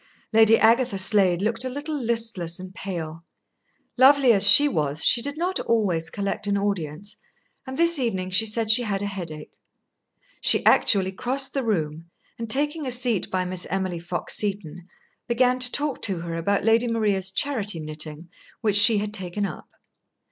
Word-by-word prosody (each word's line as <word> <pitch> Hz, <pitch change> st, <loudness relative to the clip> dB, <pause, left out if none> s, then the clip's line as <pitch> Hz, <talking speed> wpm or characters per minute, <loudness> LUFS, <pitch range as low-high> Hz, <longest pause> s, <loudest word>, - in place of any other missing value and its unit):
Lady 225 Hz, 0 st, +5 dB
Agatha 230 Hz, -1 st, +2 dB
Slade 190 Hz, -2 st, +1 dB
looked 225 Hz, +3 st, -2 dB
a 260 Hz, -, -3 dB
little 290 Hz, +4 st, -5 dB
listless 225 Hz, -, -3 dB
and 185 Hz, 0 st, -10 dB
pale. 165 Hz, -5 st, -7 dB, 0.8 s
Lovely 265 Hz, -2 st, +5 dB
as 200 Hz, -1 st, +6 dB
she 290 Hz, +8 st, +8 dB
was, 150 Hz, -, -2 dB
she 240 Hz, -, +5 dB
did 285 Hz, +4 st, -5 dB
not 360 Hz, +3 st, -2 dB
always 185 Hz, -8 st, -1 dB
collect 200 Hz, +1 st, -4 dB
an 200 Hz, 0 st, 0 dB
audience, 200 Hz, 0 st, -4 dB, 0.5 s
and 260 Hz, 0 st, -7 dB
this 335 Hz, -2 st, +2 dB
evening 190 Hz, -7 st, -3 dB
she 220 Hz, +4 st, +3 dB
said 220 Hz, 0 st, 0 dB
she 230 Hz, -, +6 dB
had 205 Hz, -4 st, -3 dB
a -, -, -2 dB
headache. 170 Hz, -6 st, -8 dB, 0.9 s
She -, -, +1 dB
actually 190 Hz, -2 st, +3 dB
crossed 265 Hz, +7 st, -1 dB
the 275 Hz, -, -2 dB
room, 165 Hz, -6 st, -3 dB, 0.3 s
and 230 Hz, -1 st, -6 dB
taking 295 Hz, +4 st, 0 dB
a -, -, -1 dB
seat 240 Hz, -5 st, 0 dB
by 185 Hz, -1 st, -2 dB
Miss 180 Hz, 0 st, -3 dB
Emily 185 Hz, -2 st, -3 dB
Fox 175 Hz, +1 st, -4 dB
Seton, 190 Hz, -4 st, -3 dB, 0.4 s
began 250 Hz, +1 st, +1 dB
to 250 Hz, -1 st, +3 dB
talk 290 Hz, -1 st, -2 dB
to 190 Hz, -5 st, -1 dB
her 170 Hz, 0 st, -6 dB
about 195 Hz, +5 st, -2 dB
Lady 230 Hz, +2 st, +2 dB
Maria's 205 Hz, -5 st, -1 dB
charity 210 Hz, -5 st, -2 dB
knitting 155 Hz, +1 st, -7 dB, 0.3 s
which 210 Hz, -3 st, +3 dB
she 215 Hz, +1 st, +7 dB
had 210 Hz, +1 st, -4 dB
taken 190 Hz, 0 st, -3 dB
up. -, -, -9 dB
205 Hz, 170 wpm, -23 LUFS, 180-240 Hz, 0.9 s, she